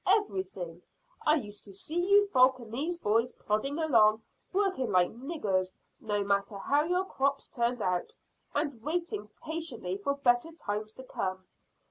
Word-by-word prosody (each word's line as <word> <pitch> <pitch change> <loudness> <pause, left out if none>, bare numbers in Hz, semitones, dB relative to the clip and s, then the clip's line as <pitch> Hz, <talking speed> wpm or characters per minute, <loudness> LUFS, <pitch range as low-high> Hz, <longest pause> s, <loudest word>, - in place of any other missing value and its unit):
"Everything. 190 - +1 0.5
I 305 - +6
used 210 -8 -5
to 200 - -12
see 310 - -3
you 405 +1 +7
folk 260 -4 +5
and 230 -3 -11
these 320 +8 -1
boys 230 -2 +1
plodding 215 +8 -1
along, 225 -9 +4 0.3
working 380 - +1
like 180 -2 +4
niggers, 215 - -1 0.3
no 205 -2 -1
matter 200 0 0
how 285 +8 +2
your 360 +2 +1
crops 275 -5 0
turned 235 -1 -1
out, 180 -1 0 0.4
and 290 -5 -1
waiting 310 -8 -2
patiently 305 - -3
for 280 +7 0
better 255 +2 +2
times 215 -8 -4
to 260 - -10
come." 185 -6 -3
240 Hz, 150 wpm, -30 LUFS, 205-305 Hz, 0.5 s, you